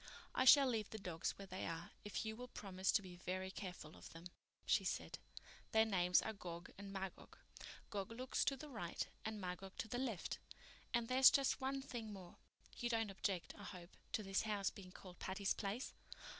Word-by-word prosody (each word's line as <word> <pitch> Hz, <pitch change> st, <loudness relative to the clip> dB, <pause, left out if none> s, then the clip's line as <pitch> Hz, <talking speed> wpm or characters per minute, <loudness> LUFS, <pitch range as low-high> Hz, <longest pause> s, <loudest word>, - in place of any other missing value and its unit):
"I 260 Hz, -, +3 dB
shall 275 Hz, +2 st, +11 dB
leave 220 Hz, -4 st, 0 dB
the 220 Hz, -, -5 dB
dogs 175 Hz, -5 st, -2 dB
where 195 Hz, -, -6 dB
they 185 Hz, -1 st, -4 dB
are, 165 Hz, +1 st, -4 dB
if 210 Hz, +2 st, -2 dB
you 220 Hz, 0 st, -2 dB
will 250 Hz, +2 st, -6 dB
promise 190 Hz, -5 st, 0 dB
to 205 Hz, -, +4 dB
be 180 Hz, -1 st, -8 dB
very 185 Hz, +1 st, -2 dB
careful 180 Hz, -6 st, -6 dB
of -, -, -10 dB
them," 165 Hz, +1 st, -9 dB, 0.4 s
she -, -, +4 dB
said. -, -, -2 dB, 0.5 s
"Their 220 Hz, 0 st, +7 dB
names 180 Hz, -4 st, +4 dB
are -, -, -2 dB
Gog 175 Hz, -3 st, -6 dB
and 200 Hz, 0 st, -7 dB
Magog. 195 Hz, -1 st, -5 dB, 0.5 s
Gog 200 Hz, 0 st, -2 dB
looks 255 Hz, +3 st, 0 dB
to 275 Hz, -, +2 dB
the 305 Hz, -, -7 dB
right 215 Hz, -11 st, -3 dB, 0.2 s
and 220 Hz, -1 st, -2 dB
Magog 190 Hz, +1 st, -5 dB
to -, -, -2 dB
the 245 Hz, +3 st, -2 dB
left. 235 Hz, -9 st, -1 dB, 0.5 s
And 235 Hz, -1 st, +2 dB
there's 260 Hz, +2 st, +9 dB
just 275 Hz, -1 st, +3 dB
one 270 Hz, +1 st, 0 dB
thing 235 Hz, -5 st, -4 dB
more. 185 Hz, -3 st, -9 dB, 0.4 s
You 240 Hz, -, 0 dB
don't 225 Hz, -3 st, +1 dB
object, 190 Hz, -2 st, -1 dB
I 205 Hz, -, -10 dB
hope, 180 Hz, -3 st, -8 dB, 0.2 s
to 215 Hz, -, +1 dB
this 195 Hz, 0 st, +2 dB
house 205 Hz, -3 st, +1 dB
being 185 Hz, -2 st, -10 dB
called 180 Hz, -1 st, -11 dB
Patty's 195 Hz, +1 st, +1 dB
Place?" 210 Hz, +5 st, -2 dB
200 Hz, 200 wpm, -41 LUFS, 185-230 Hz, 0.5 s, shall